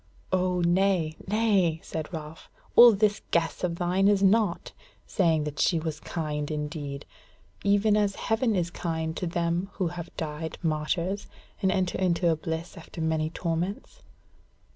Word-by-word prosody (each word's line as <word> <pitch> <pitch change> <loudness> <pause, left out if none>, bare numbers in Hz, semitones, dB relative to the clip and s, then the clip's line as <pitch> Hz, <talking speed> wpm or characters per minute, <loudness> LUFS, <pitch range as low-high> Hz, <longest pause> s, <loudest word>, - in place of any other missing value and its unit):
"O 180 -1 +1
nay, 175 -2 +2
nay!" 200 -6 +2
said 155 -1 -5
Ralph, 155 -1 -8 0.3
"all 240 -1 +10
this 210 +1 +1
guess 165 +1 0
of 175 -2 0
thine 180 +3 +1
is 200 -1 +3
naught, 200 -2 +2 0.3
saying 165 -6 +2
that 150 -1 -5
she 170 - +3
was 160 -1 -3
kind 150 -3 -3
indeed. 150 -2 -4 0.6
Even 205 +1 +3
as 205 -2 +1
heaven 225 0 0
is 175 -2 -1
kind 160 -2 -3
to 180 - -3
them 170 +2 -1
who 180 -3 -1
have 175 0 -7
died 160 0 -4
martyrs, 170 +5 -1 0.3
and 190 -2 +3
enter 185 -2 0
into 180 -1 +2
its 160 -1 -2
bliss 160 +3 -4
after 165 +1 -10
many 160 -1 0
torments." 170 +4 -3
170 Hz, 150 wpm, -27 LUFS, 160-195 Hz, 0.6 s, all